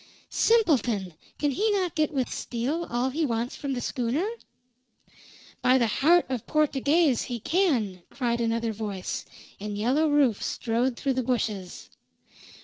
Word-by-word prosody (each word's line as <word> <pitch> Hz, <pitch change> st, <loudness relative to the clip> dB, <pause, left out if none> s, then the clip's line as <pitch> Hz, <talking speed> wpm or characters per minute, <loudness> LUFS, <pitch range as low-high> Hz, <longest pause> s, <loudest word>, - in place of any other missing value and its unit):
"Simpleton! 245 Hz, -, +2 dB, 0.2 s
Can 290 Hz, -1 st, +1 dB
he 425 Hz, +11 st, +1 dB
not 370 Hz, -4 st, 0 dB
get 310 Hz, -2 st, +1 dB
with 265 Hz, -4 st, 0 dB
steel 275 Hz, +8 st, -2 dB
all 245 Hz, +2 st, 0 dB
he 320 Hz, +5 st, -1 dB
wants 235 Hz, -3 st, -1 dB
from 280 Hz, -1 st, -3 dB
the 245 Hz, -, -3 dB
schooner?" 255 Hz, -, -1 dB, 1.3 s
"By 255 Hz, +1 st, +5 dB
the 240 Hz, -, +3 dB
heart 320 Hz, +10 st, +4 dB
of 255 Hz, -4 st, -4 dB
Portuguez, 300 Hz, -1 st, +2 dB
he 245 Hz, -2 st, -4 dB
can!" 240 Hz, -, +1 dB
cried 240 Hz, -3 st, -1 dB
another 230 Hz, 0 st, 0 dB
voice, 205 Hz, -3 st, -4 dB, 0.3 s
and 205 Hz, 0 st, -5 dB
Yellow 270 Hz, +9 st, +2 dB
Rufe 280 Hz, -7 st, +3 dB
strode 235 Hz, +2 st, -1 dB
through 275 Hz, -1 st, 0 dB
the 260 Hz, -, 0 dB
bushes. 215 Hz, -7 st, -3 dB
255 Hz, 140 wpm, -27 LUFS, 230-300 Hz, 1.3 s, By